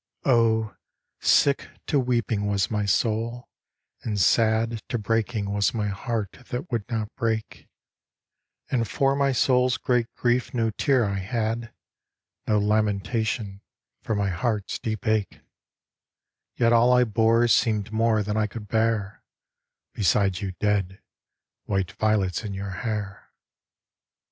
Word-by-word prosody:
Oh, 110 -4 +2 0.4
sick 140 -1 +3 0.2
to 145 - +1
weeping 120 -5 0
was 100 0 0
my 105 -1 0
soul, 115 +3 -1 0.5
and 105 -3 -2
sad 110 +5 +2
To 120 - -1
breaking 110 -1 -1
was 100 +2 +1
my 105 -2 -1
heart 105 +1 -4
that 130 +7 -5
would 115 -4 -2
not 110 -2 -3
break; 115 -3 -3 1.0
And 120 -3 +1
for 135 +6 +1
my 140 0 +2
soul's 125 0 +2
great 125 -2 +1
grief 125 +1 0
no 115 -2 +1
tear 130 +1 +2
I 100 -1 -2
had, 115 +3 -2 0.8
No 105 - +3
lamentation 105 0 0 0.4
for 110 - -2
my 100 -1 0
heart's 105 +3 -2
deep 110 -3 -4
ache; 110 -2 0 1.1
Yet 115 -1 +3
all 120 +1 +5
I 125 0 +5
bore 115 +1 +3
seemed 110 -2 +2
more 110 -1 +2
than 105 +1 -3
I 110 -1 +1
could 105 +1 -9
bear 110 -2 0 0.7
Beside 100 -1 +1
you 95 -2 -3
dead, 95 -1 -1 0.7
white 95 -3 -1
violets 105 -3 0
in 100 -2 -5
your 100 0 -5
hair. 105 -1 -5
110 Hz, 130 wpm, -25 LUFS, 100-115 Hz, 1.1 s, all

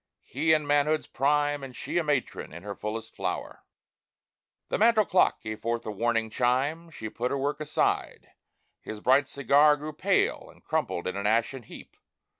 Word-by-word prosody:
He 155 +5 0
in 155 -1 +3
manhood's 145 +1 +2
prime 145 +1 +1
And 130 -2 -8
she - - -2
a - - 0
matron 145 -4 -2
in 85 +3 -10
her 100 0 -5
fullest 105 +2 -6
flower. - - -4 1.1
The - - -1
mantel 220 -1 +5
clock 185 - +2
gave 110 0 -6
forth 115 +1 -2
a 110 - -3
warning 115 +1 0
chime. 135 +8 0
She 110 -8 -7
put 120 +3 -3
her 140 - -1
work 145 +2 -2
aside; 155 0 -1 0.5
his 110 - -7
bright 130 +5 +3
cigar 145 +2 +4
Grew 150 +2 -6
pale, - - 0
and - - -19
crumbled 85 - -2
in 90 - -3
an 100 +1 -1
ashen 115 +4 +1
heap. 115 - -13
135 Hz, 175 wpm, -27 LUFS, 115-150 Hz, 1.1 s, mantel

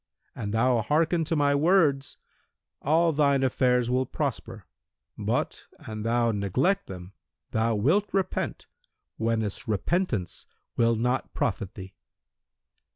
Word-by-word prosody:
An 100 - -4
thou 115 +2 +2
hearken 160 +8 +1
to 165 - -1
my 145 -1 +3
words, 145 -3 +2 0.6
all 165 +3 +3
thine 140 -2 +3
affairs 125 -2 +2
will 130 +1 +1
prosper; 120 - -4 0.5
but, - - -2
an 110 -1 -7
thou 115 +1 +1
neglect 125 - 0
them 90 0 -9 0.4
thou 110 +1 +1
wilt 160 - +2
repent, 195 -1 -2 0.5
whenas 110 -2 -2
repentance 110 - -1 0.3
will 115 0 +3
not 125 +3 -1
profit 100 -6 -2
thee." 95 0 -9
125 Hz, 115 wpm, -27 LUFS, 110-150 Hz, 0.6 s, my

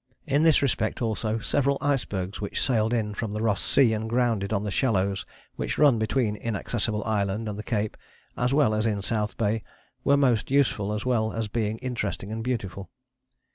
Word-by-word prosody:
In 145 0 +2
this 160 -3 +5
respect 110 -5 0
also 110 -1 -1
several 140 +5 +1
icebergs 105 -10 -1
which 100 - -3
sailed 115 -4 +2
in 110 -3 0
from 105 0 -4
the 105 - -2
Ross 105 -3 +1
Sea 120 -5 +4
and 110 +1 -3
grounded 115 -4 +1
on 105 -2 0
the 105 - -3
shallows 100 -5 0 0.3
which - - -2
run 140 -6 +5
between 110 -1 +1
Inaccessible 105 0 -2
Island 105 0 -1
and 105 - -3
the 105 - -5
cape, 105 -1 -2 0.4
as 125 +1 0
well 140 -6 +3
as 110 +1 +1
in 100 -3 -1
South 105 -1 -1
Bay, 110 0 0 0.4
were 140 0 +4
most 125 -6 +2
useful 125 -7 +2
as 105 +2 -3
well 110 -3 +1
as 115 -1 -2
being 110 0 -1
interesting 105 -5 -3
and 110 0 -3
beautiful. 100 -6 -3
110 Hz, 185 wpm, -26 LUFS, 105-125 Hz, 0.4 s, this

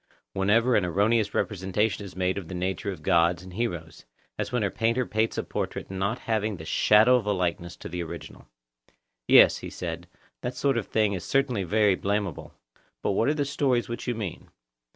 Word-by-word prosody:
Whenever 115 +6 +3
an 100 - +3
erroneous 100 +4 +1
representation 105 +1 -1
is 95 -2 -10
made 95 +1 0
of 90 - -10
the 90 - -6
nature 95 +3 -2
of 85 -5 -9
gods 85 -1 +3
and 90 -1 -11
heroes,—as 85 - -6
when 125 -3 0
a 100 - 0
painter 115 +2 0
paints 110 +1 -1
a - - -1
portrait - - -4
not 95 +5 -1
having 110 -4 -1
the 80 - -9
shadow 110 +8 +5
of 110 -4 -4
a - - +2
likeness 85 -2 -2
to - - -9
the 90 +1 -4
original. 85 - -8 0.8
Yes, - - +7
he - - -7
said, - - -6 0.3
that 125 +1 -4
sort 135 -1 +1
of 110 - -7
thing 105 -2 +1
is 90 -3 -4
certainly 130 -2 +1
very 105 +2 +3
blameable; 100 -3 -3 0.5
but - - +1
what 115 +6 +2
are 150 - +1
the 145 -2 0
stories 135 -3 0
which 115 +1 -6
you 120 - 0
mean? 105 -6 -6
105 Hz, 195 wpm, -26 LUFS, 90-115 Hz, 0.8 s, Yes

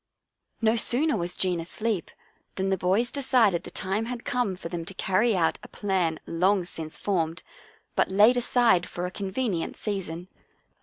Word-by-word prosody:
No 225 +1 +4
sooner 285 +7 +3
was 175 0 -3
Jean 180 -2 +2
asleep 200 +4 -2 0.5
than 190 0 -1
the - - +3
boys 195 +7 +1
de 280 - -3
cided 230 -10 +3
the - - -9
time 195 +4 -2
had 240 0 -6
come 245 -6 0
for 180 - -7
them 170 -1 -4
to 190 - -7
carry 205 +5 +2
out 165 -2 +1
a - - -11
plan 185 -6 -1
long 185 +2 +1
since 160 -3 -6
formed, 170 -4 -1 0.5
but - - +2
laid 210 +6 +5
aside 235 -7 +3
for 175 - -4
a 180 - -4
convenient 195 -2 -2
season. 180 -4 -4
190 Hz, 170 wpm, -26 LUFS, 175-225 Hz, 0.5 s, laid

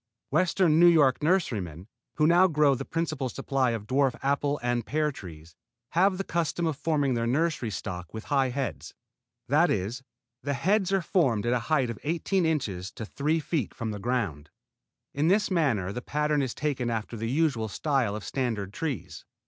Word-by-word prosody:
Western 170 0 +3
New 175 - +8
York 150 -6 +4
nurserymen, 110 - 0 0.3
who 155 - +3
now 175 +3 +6
grow 150 -4 +3
the 135 +1 -3
principal 155 -4 -2
supply 135 0 0
of 115 -3 -3
dwarf 130 +1 +1
apple 140 +1 0
and 120 -1 0
pear 150 +5 0
trees, 80 - -11 0.3
have 185 +2 +3
the 195 - -2
custom 170 -1 -1
of 160 -2 0
forming 145 -2 0
their 115 -1 0
nursery 150 -2 0
stock 90 -4 -6
with 110 0 -7
high 135 -3 +1
heads. 120 - -4 0.5
That - - +4
is, 110 +8 -2 0.4
the 140 0 -2
heads 195 - +1
are 195 -2 +2
formed 130 - +1
at 120 - +2
a 125 - +2
height 135 -6 +2
of 115 - -8
eighteen 170 +3 0
inches 100 - -2
to 110 - -6
three 150 +8 0
feet 150 - -2
from 115 -1 -3
the 105 - -5
ground. 95 - -2 0.6
In 145 +3 +1
this 205 +3 +2
matter 120 - +1
the 125 - -4
pattern 150 +2 0
is 130 -3 -3
taken 135 -5 -1
after 115 0 -3
the 115 +1 -3
usual 135 -5 +1
style 125 -1 0
of 105 - -6
standard 110 -3 -2
trees. 140 - -4
135 Hz, 180 wpm, -27 LUFS, 115-160 Hz, 0.6 s, New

